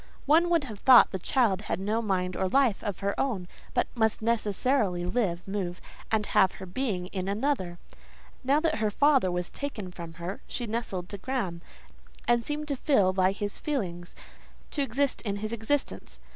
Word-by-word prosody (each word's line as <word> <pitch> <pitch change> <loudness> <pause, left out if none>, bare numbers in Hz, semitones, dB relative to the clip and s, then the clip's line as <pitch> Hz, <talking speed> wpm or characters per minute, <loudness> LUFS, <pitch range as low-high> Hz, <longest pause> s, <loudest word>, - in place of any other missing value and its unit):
One 325 +4 +4
would 335 -3 +3
have 220 -7 -8
thought 255 +1 +7
the 190 - -3
child 215 -3 +2
had 185 - -3
no 215 +4 0
mind 185 -4 -1
or 190 - 0
life 255 -3 +2
of 205 -4 -4
her 200 0 0
own, 210 -10 -1 0.3
but - - +3
must 220 -2 +1
necessarily 220 -3 +1
live, 180 -5 -1
move, 190 -3 -3 0.3
and 220 -1 +2
have 190 -2 +3
her - - -8
being 185 -2 -2
in 185 -1 -2
another: 200 -4 -1 0.7
now 275 +3 +3
that 315 -7 0
her 215 -1 +2
father 270 -4 +3
was 180 0 -3
taken 225 -10 -5
from 170 -2 -8
her, 170 +4 -6
she 240 - -3
nestled 210 -5 -3
to 200 - -6
Graham, 195 -8 -3 0.7
and 240 -1 +3
seemed 300 +3 -3
to 280 - 0
feel 210 -9 +3
by 185 0 +3
his 205 +1 -3
feelings: 180 - -3 0.6
to 290 - -1
exist 275 +1 0
in 200 -3 -2
his 215 +2 -4
existence. 235 +6 -2
210 Hz, 180 wpm, -28 LUFS, 185-260 Hz, 0.7 s, thought